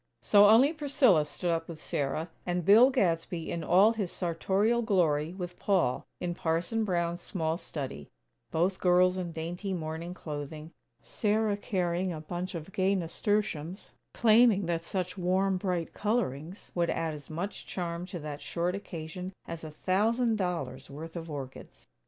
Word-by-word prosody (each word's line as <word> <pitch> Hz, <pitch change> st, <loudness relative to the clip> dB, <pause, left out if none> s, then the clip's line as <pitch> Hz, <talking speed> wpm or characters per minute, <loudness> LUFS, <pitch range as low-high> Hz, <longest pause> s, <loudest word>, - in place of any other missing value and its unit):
So 205 Hz, 0 st, +7 dB
only 255 Hz, +8 st, +6 dB
Priscilla 270 Hz, -, +3 dB
stood 175 Hz, +3 st, -2 dB
up 165 Hz, -1 st, -1 dB
with 165 Hz, -2 st, -8 dB
Sarah; 155 Hz, +3 st, -2 dB
and 175 Hz, -1 st, -2 dB
Bill 225 Hz, +6 st, +8 dB
Gadsby, 170 Hz, -8 st, 0 dB
in 170 Hz, -, -3 dB
all 195 Hz, +8 st, +5 dB
his 205 Hz, -6 st, -3 dB
sartorial 195 Hz, +6 st, +1 dB
glory, 170 Hz, -7 st, +1 dB
with 180 Hz, -2 st, -6 dB
Paul, 180 Hz, -11 st, +1 dB
in 175 Hz, -1 st, -2 dB
Parson 170 Hz, +7 st, -1 dB
Brown's 175 Hz, -3 st, -1 dB
small 160 Hz, -5 st, -2 dB
study; 135 Hz, -, -6 dB, 0.4 s
both 180 Hz, +4 st, 0 dB
girls 180 Hz, +1 st, +4 dB
in 175 Hz, -2 st, -3 dB
dainty 175 Hz, +5 st, -4 dB
morning 165 Hz, +1 st, -4 dB
clothing; 150 Hz, 0 st, -6 dB, 0.3 s
Sarah 215 Hz, -1 st, +1 dB
carrying 185 Hz, -3 st, -1 dB
a 160 Hz, -, -5 dB
bunch 175 Hz, +4 st, -5 dB
of 165 Hz, +3 st, -7 dB
gay 190 Hz, +1 st, +2 dB
nasturtiums, 185 Hz, -1 st, -2 dB, 0.2 s
claiming 220 Hz, -3 st, +5 dB
that 165 Hz, -1 st, -1 dB
such 185 Hz, +1 st, -3 dB
warm, 185 Hz, +2 st, +2 dB
bright 180 Hz, -3 st, -2 dB
colorings 190 Hz, -, -2 dB
would 170 Hz, -1 st, +1 dB
add 165 Hz, -1 st, -1 dB
as 145 Hz, -2 st, -10 dB
much 175 Hz, +6 st, -5 dB
charm 175 Hz, -1 st, -4 dB
to 180 Hz, -, -6 dB
that 150 Hz, -2 st, -6 dB
short 175 Hz, +1 st, -1 dB
occasion 180 Hz, -1 st, -6 dB, 0.2 s
as 165 Hz, -1 st, -6 dB
a 155 Hz, -, -6 dB
thousand 220 Hz, +9 st, +1 dB
dollars' 180 Hz, -9 st, -3 dB
worth 160 Hz, +4 st, -8 dB
of 165 Hz, -1 st, -6 dB
orchids. 135 Hz, -3 st, -8 dB
175 Hz, 155 wpm, -30 LUFS, 165-195 Hz, 0.4 s, Bill